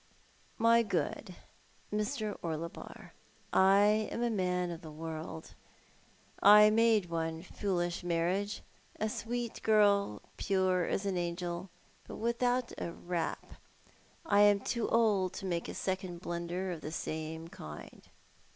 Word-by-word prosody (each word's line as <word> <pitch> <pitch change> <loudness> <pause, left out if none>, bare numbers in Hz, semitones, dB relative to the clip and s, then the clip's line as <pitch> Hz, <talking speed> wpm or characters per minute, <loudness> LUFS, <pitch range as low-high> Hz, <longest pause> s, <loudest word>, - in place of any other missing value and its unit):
" - - -32
My 230 0 +6
good 215 -3 -2 0.6
Mr. 215 0 -1
Orlebar, 165 0 -6 0.4
I 205 +3 +4
am 235 - -2
a 240 - +1
man 180 -3 0
of 170 0 -7
the 160 - -9
world. 160 +1 -7 0.9
I 210 +1 +8
made 225 -2 +4
one 165 0 -2
foolish 175 -3 -2
marriage 175 +5 -1 0.2
— - - -32
a 215 - +1
sweet 235 +2 -4
girl, 200 - +3
pure 185 -2 +1
as 195 - -1
an 195 -2 -1
angel, 175 +1 -3 0.4
but - - -7
with 235 +2 -2
out 245 0 +1
a 170 - -3
rap. 175 -1 -4 0.7
I 200 - +3
am 205 -1 +5
too 235 +1 -2
old 205 -5 +2
to 195 - -6
make 170 -2 -2
a - - -6
second 185 -2 -3
blunder 175 +2 -3
of 170 - -6
the 155 - -6
same 160 0 -4
kind. 75 - -10
185 Hz, 140 wpm, -32 LUFS, 170-210 Hz, 0.9 s, I